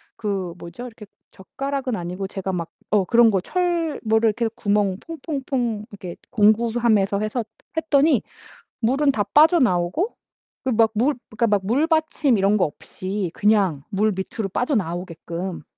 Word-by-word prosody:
그 195 -5 -3
뭐죠? 175 +9 -9
이렇게 220 -2 -12 0.3
젓가락은 270 +5 -4
아니고 180 +2 -4
제가 190 0 -4
막 170 -2 -3 0.2
어 205 -3 +4
그런 235 +3 +5
거 190 -2 +1
철 345 - -1
뭐를 220 +1 +3
이렇게 230 +2 -1
해서 220 - -1
구멍 205 -2 +1
퐁퐁퐁 265 -8 -3
이렇게 185 -4 -8 0.2
공구함에서 220 -2 +3
해서 215 +3 -2 0.3
했더니 295 -4 +3 0.6
물은 275 +5 +2
다 210 -6 0
빠져나오고 290 - +3 0.5
그 - - +1
막 225 0 +4
물 255 +6 +2
그러니까 225 +2 0
막 200 -2 +1
물받침 305 - +2
이런 195 +2 +3
거 185 - +2
없이 185 +5 -5
그냥 195 -9 +2
물 215 +1 +1
밑으로 195 +2 -4
빠져나오게끔. 180 - -3
215 Hz, 310 characters per minute, -22 LUFS, 190-260 Hz, 0.6 s, 그런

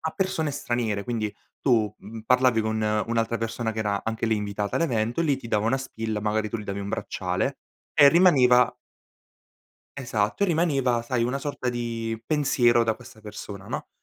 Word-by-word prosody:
a 160 - -2
persone 190 -5 -1
straniere. 120 -7 -2
Quindi 110 -4 -2 0.3
tu, 110 -6 +2
mhmm, 110 +3 -9
parlavi 125 0 +3
con 110 0 -1 0.3
un'altra 115 0 0
persona 115 0 -2
che 110 - -7
era 100 -2 -1
anche 115 0 -2
lì 110 - +2
invitata 105 0 -3
all'evento, 120 -4 0
lì 145 -5 +2
ti 130 - -9
dava 105 0 +1
una 135 +3 +2
spilla 110 -4 -4
magari 105 0 0
tu 115 - -3
gli 105 - -7
davi 100 0 -4
un 100 - -5
bracciale - - -2 0.4
e 145 -1 +8
rimaneva 135 -8 +5 1.2
Esatto 115 - -1
e - - +5
rimaneva 140 -8 +1
sai 120 -1 0
una 125 +3 -1
sorta 140 -3 -3
di 115 -2 -3
pensiero 120 -5 +3
da 110 -1 0
questa 110 - -15
persona 100 -1 -8
no; - - -4
115 Hz, 175 wpm, -25 LUFS, 110-130 Hz, 1.2 s, e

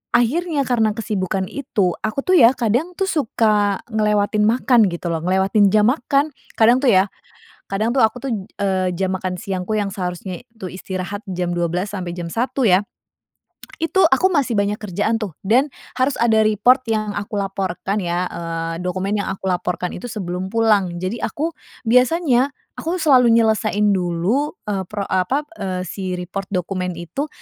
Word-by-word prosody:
akhirnya 290 +5 +1
karena 225 -5 +1
kesibukan 195 -4 -2
itu 205 -4 -1
aku 215 +6 -2
tuh 370 -2 +4
ya 240 +3 +7
kadang 250 - 0
tuh 390 - -1
suka 215 - +1
ngelewatin 210 -1 +2
makan 235 -2 +4
gitu 170 -1 -3
loh. 165 - -1
Ngelewatin 190 +4 +3
jam 210 +3 +4
makan. 280 +2 0 0.2
Kadang 235 +3 +5
tuh 270 - 0
ya 195 -3 +4 0.6
kadang 220 +6 0
tuh 255 - +5
aku 225 +2 0
tuh, 270 - -4 0.3
eee, 185 -2 +1
jam 190 +1 -1
makan 185 -1 -4
siangku 190 +1 -3
yang 200 - -1
seharusnya 185 +1 -5 0.2
tuh 185 - -4
istirahat 190 +2 -5
jam 180 -2 -3
12.00 175 +3 -1
sampai 180 -2 -4
jam 175 -1 -5
1.00 240 +5 0
ya. 185 +2 +4 1.0
Itu 380 +4 +3
aku 265 +8 +4
masih 285 -9 +1
banyak 205 0 0
kerjaan 210 +2 -1
tuh 210 -6 -5
dan 235 +8 +3 0.3
harus 260 +2 +2
ada 220 -2 +4
report 245 +5 +3
yang 215 -2 -1
aku 205 0 -3
laporkan 195 0 -2
ya, 180 -2 -1
eee, 165 -1 -4
dokumen 190 +3 -1
yang 200 -1 -2
aku 190 0 -4
laporkan 180 0 -1
itu 180 - -8
sebelum 190 -5 -4
pulang. 210 -6 +3
Jadi 185 +5 -2
aku, 320 +3 -2 0.3
biasanya 255 +2 +3 0.3
aku 335 +3 -2
selalu 270 -7 +5
nyelesain 215 -2 +2
dulu, 190 - 0
eee, 195 -2 -1
pro 205 +1 -4
apa, 190 +11 0 0.2
eee, 185 -2 -2
si 185 +1 -4
report 185 +2 -5
dokumen 180 0 -2
itu 175 - -4
205 Hz, 165 wpm, -20 LUFS, 185-240 Hz, 1.0 s, ya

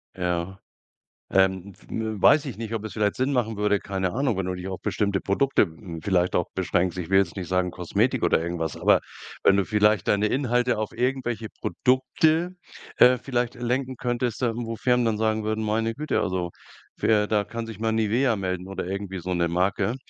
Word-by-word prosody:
Ja. 90 +1 -2 0.7
Ähm, 95 0 +1
f 100 - -22
w 110 -3 -4
weiß 155 - +6
ich 135 -5 -6
nicht, 115 0 -6
ob 110 -2 -3
es 110 - -6
vielleicht 105 -2 0
Sinn 130 +2 0
machen 115 -4 0
würde, 105 -1 +1
keine 95 -2 -2
Ahnung, 130 -4 0
wenn 95 - -1
du 90 - -2
dich 90 +1 -6
auf 95 - -5
bestimmte 100 -2 0
Produkte, 135 +8 +2
hm, 80 0 -5
vielleicht 90 0 +1
auch 90 - +1
beschränkst. 90 -1 0
Ich 90 0 -5
will 95 - +5
jetzt 95 -3 +1
nicht 95 -3 -5
sagen 90 -1 0
Kosmetik 90 -2 0
oder - - +3
irgendwas, 80 -2 -3
aber - - +4 0.4
wenn 100 - +5
du 100 - +2
vielleicht 105 +1 +2
deine 105 +1 +2
Inhalte 125 -2 +1
auf 110 -1 -3
irgendwelche 120 -3 -1
Produkte, 155 +7 +1 0.4
äh, 125 0 +7
vielleicht 120 -1 -2
lenken 125 +2 -2
könntest, 120 -1 -2
da 120 -3 +1
wo 115 -1 -4
Firmen 125 +1 +2
dann 110 -2 0
sagen 110 0 +1
würden: 110 +1 -2
„Meine 110 +1 0
Güte, 150 +4 -1
also 90 -2 -2 0.5
für“ 105 -2 +2
da 105 -1 +1
kann 115 +2 -6
sich 110 -2 -9
mal 115 - +1
Nivea 115 +3 +2
melden 95 -1 -3
oder 95 - -4
irgendwie 95 0 -4
so 90 +1 -3
'ne 85 -1 +1
Marke 95 +6 0
105 Hz, 200 wpm, -25 LUFS, 95-120 Hz, 0.7 s, äh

